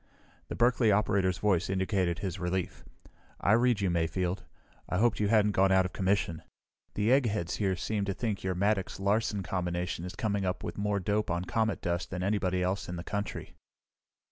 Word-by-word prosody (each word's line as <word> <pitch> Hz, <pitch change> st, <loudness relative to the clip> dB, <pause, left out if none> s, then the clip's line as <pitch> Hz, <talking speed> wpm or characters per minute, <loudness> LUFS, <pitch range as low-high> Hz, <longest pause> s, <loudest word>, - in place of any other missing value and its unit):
The -, -, -5 dB
Berkeley 120 Hz, -2 st, +3 dB
operator's 100 Hz, -3 st, +2 dB
voice 95 Hz, -3 st, +1 dB
indicated 95 Hz, -2 st, 0 dB
his 95 Hz, 0 st, -4 dB
relief. 90 Hz, 0 st, -3 dB, 0.6 s
"I 100 Hz, -, +2 dB
read 120 Hz, -1 st, +3 dB
you, 95 Hz, -3 st, +1 dB
Mayfield. 85 Hz, +2 st, -1 dB, 0.5 s
I -, -, 0 dB
hoped 115 Hz, +2 st, +2 dB
you 105 Hz, -, +2 dB
hadn't 105 Hz, -1 st, +4 dB
gone 95 Hz, -1 st, +3 dB
out 95 Hz, -1 st, +4 dB
of 90 Hz, -, -5 dB
commission. 95 Hz, -4 st, 0 dB, 0.5 s
The 105 Hz, +3 st, +2 dB
eggheads 110 Hz, -9 st, +1 dB
here 95 Hz, -3 st, +1 dB
seem 100 Hz, +2 st, -2 dB
to 100 Hz, -, -1 dB
think 110 Hz, -5 st, -2 dB
your 95 Hz, -1 st, -1 dB
Maddox 100 Hz, +1 st, 0 dB
Larsen 100 Hz, 0 st, 0 dB
combination 90 Hz, 0 st, -2 dB
is 90 Hz, -, -6 dB
coming 100 Hz, -4 st, -1 dB
up 90 Hz, -1 st, -2 dB
with -, -, -4 dB
more 100 Hz, 0 st, 0 dB
dope 105 Hz, +3 st, 0 dB
on 85 Hz, +1 st, -1 dB
comet 110 Hz, +1 st, 0 dB
dust 85 Hz, 0 st, -2 dB
than 90 Hz, 0 st, -4 dB
anybody 95 Hz, -2 st, 0 dB
else 95 Hz, +1 st, -2 dB
in 90 Hz, -, -4 dB
the 85 Hz, -, -5 dB
country." 100 Hz, +3 st, -4 dB
95 Hz, 185 wpm, -30 LUFS, 90-105 Hz, 0.6 s, hadn't